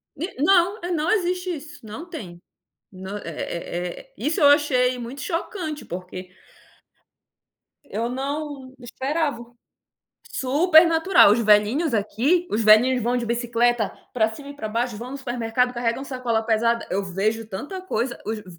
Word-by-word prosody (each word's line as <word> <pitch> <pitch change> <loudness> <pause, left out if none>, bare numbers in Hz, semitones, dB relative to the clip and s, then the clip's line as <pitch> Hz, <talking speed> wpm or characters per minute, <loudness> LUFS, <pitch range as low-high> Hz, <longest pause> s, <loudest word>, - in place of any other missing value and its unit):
E 315 -3 -6
não 375 +4 +4
eh, 350 - -3
não 320 0 0
existe 365 -3 0
isso, 300 -6 -11
não 290 +12 -8
tem. 180 - -8 0.5
Não, 190 +2 -7
eh - - -12
eh 170 +2 -4
eh, - - -18
isso 295 +9 -1
eu 290 - +6
achei 255 -4 +3
muito 245 +3 -7
chocante, 330 - -4
porque 185 +1 -7 1.6
eu 230 -1 -3
não 275 0 -5
esperava. 270 +2 -2 0.9
Super 315 +6 +5
natural, 330 - +5
os 215 - +4
velhinhos 225 +7 +3
aqui, 245 - +1
os 215 +2 0
velhinhos 230 +3 +5
vão 245 +2 +1
de 245 - -1
bicicleta 235 -1 0 0.2
pra 220 -3 +2
cima 280 +6 -9
e - - -9
pra 220 -6 -5
baixo, 235 +2 -1
vão 240 +4 -7
no - - -4
supermercado, 245 -1 -1
carregam 240 +2 -2
sacola 250 -4 -1
pesada. 230 +1 +1
Eu 195 +2 0
vejo 215 +4 -1
tanta 285 - -6
coisa, 245 -9 -3
os 220 0 -3
v - - -16
250 Hz, 155 wpm, -23 LUFS, 220-300 Hz, 1.6 s, eu